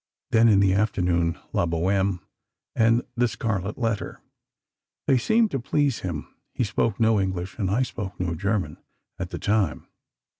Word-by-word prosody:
Then, 115 Hz, +1 st, +5 dB
in 100 Hz, -3 st, +5 dB
the 95 Hz, -1 st, +4 dB
afternoon, 90 Hz, -5 st, +1 dB, 0.2 s
'La 85 Hz, -, +1 dB
Bohême' 95 Hz, +3 st, 0 dB, 0.5 s
and 115 Hz, +1 st, +3 dB
'The 120 Hz, 0 st, +3 dB
Scarlet 105 Hz, -3 st, -3 dB
Letter.' 115 Hz, -4 st, -2 dB, 0.9 s
They 130 Hz, -, +4 dB
seemed 220 Hz, -, +2 dB
to 135 Hz, -, -1 dB
please 140 Hz, +1 st, 0 dB
him. 85 Hz, -5 st, -4 dB, 0.3 s
He -, -, +1 dB
spoke 110 Hz, -2 st, 0 dB
no 110 Hz, -2 st, +4 dB
English, 95 Hz, +1 st, -3 dB
and 95 Hz, -3 st, 0 dB
I 115 Hz, +7 st, +2 dB
spoke 100 Hz, -6 st, -6 dB
no 90 Hz, -2 st, -1 dB
German, 95 Hz, -2 st, -1 dB, 0.4 s
at -, -, -3 dB
the -, -, -5 dB
time. 100 Hz, -6 st, 0 dB
100 Hz, 155 wpm, -25 LUFS, 90-115 Hz, 0.9 s, Then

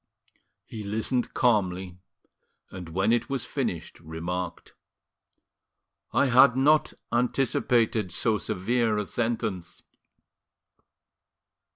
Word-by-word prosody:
He 110 Hz, -, -8 dB
listened 110 Hz, +5 st, -1 dB
calmly, 95 Hz, -6 st, +1 dB, 0.7 s
and 90 Hz, -3 st, -8 dB
when 95 Hz, +7 st, +1 dB
it 120 Hz, -1 st, 0 dB
was 135 Hz, -3 st, -2 dB
finished, -, -, -4 dB
remarked: 85 Hz, +2 st, -5 dB, 1.4 s
"I -, -, +3 dB
had 130 Hz, 0 st, +6 dB
not 150 Hz, +3 st, +3 dB, 0.2 s
anticipated 120 Hz, -4 st, +1 dB
so 110 Hz, +4 st, 0 dB
severe 110 Hz, +2 st, 0 dB
a 105 Hz, -, -1 dB
sentence." 110 Hz, -5 st, -3 dB
110 Hz, 85 wpm, -26 LUFS, 90-120 Hz, 1.4 s, had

